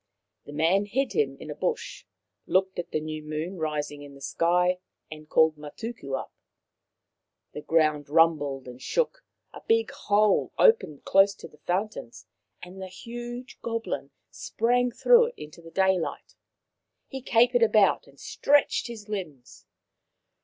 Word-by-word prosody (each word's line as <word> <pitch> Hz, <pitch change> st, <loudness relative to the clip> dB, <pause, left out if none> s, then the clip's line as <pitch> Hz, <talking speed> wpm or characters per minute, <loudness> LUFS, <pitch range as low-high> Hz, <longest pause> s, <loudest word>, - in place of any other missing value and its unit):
The -, -, -10 dB
man 165 Hz, +7 st, +2 dB
hid 265 Hz, +7 st, -1 dB
him 445 Hz, -1 st, 0 dB
in -, -, -8 dB
a -, -, -6 dB
bush, 470 Hz, -, -3 dB, 0.4 s
looked 190 Hz, 0 st, +1 dB
at 175 Hz, 0 st, -4 dB
the 155 Hz, -, -1 dB
new 155 Hz, 0 st, -5 dB
moon 155 Hz, +4 st, -5 dB
rising 150 Hz, -2 st, -3 dB
in 140 Hz, -1 st, -11 dB
the -, -, -14 dB
sky, 180 Hz, +5 st, +1 dB, 0.3 s
and 155 Hz, 0 st, -10 dB
called 160 Hz, -1 st, +4 dB
Matuku 150 Hz, -, -7 dB
up. -, -, -9 dB, 1.2 s
The 150 Hz, -, -6 dB
ground 155 Hz, -2 st, +1 dB
rumbled 145 Hz, -4 st, +2 dB
and 125 Hz, +1 st, -10 dB
shook, -, -, -1 dB, 0.3 s
a -, -, -10 dB
big 455 Hz, 0 st, +2 dB
hole 210 Hz, 0 st, +2 dB
opened 305 Hz, -, +3 dB
close 195 Hz, +1 st, +4 dB
to -, -, -10 dB
the 150 Hz, -, -22 dB
fountains, 185 Hz, -, -3 dB, 0.4 s
and 185 Hz, +2 st, -10 dB
the 190 Hz, -, -5 dB
huge 240 Hz, +5 st, -8 dB
goblin 230 Hz, -11 st, -3 dB, 0.2 s
sprang 245 Hz, +2 st, 0 dB
through 475 Hz, -, +5 dB
it 485 Hz, -, -9 dB
into 155 Hz, +3 st, -11 dB
the 165 Hz, -, -12 dB
daylight. 190 Hz, -1 st, 0 dB, 0.7 s
He 265 Hz, -1 st, -7 dB
capered 245 Hz, 0 st, +3 dB
about 215 Hz, -3 st, +4 dB
and 140 Hz, 0 st, -20 dB
stretched 290 Hz, -2 st, +2 dB
his 225 Hz, -3 st, -9 dB
limbs. 165 Hz, -12 st, -7 dB
185 Hz, 145 wpm, -27 LUFS, 155-230 Hz, 1.2 s, through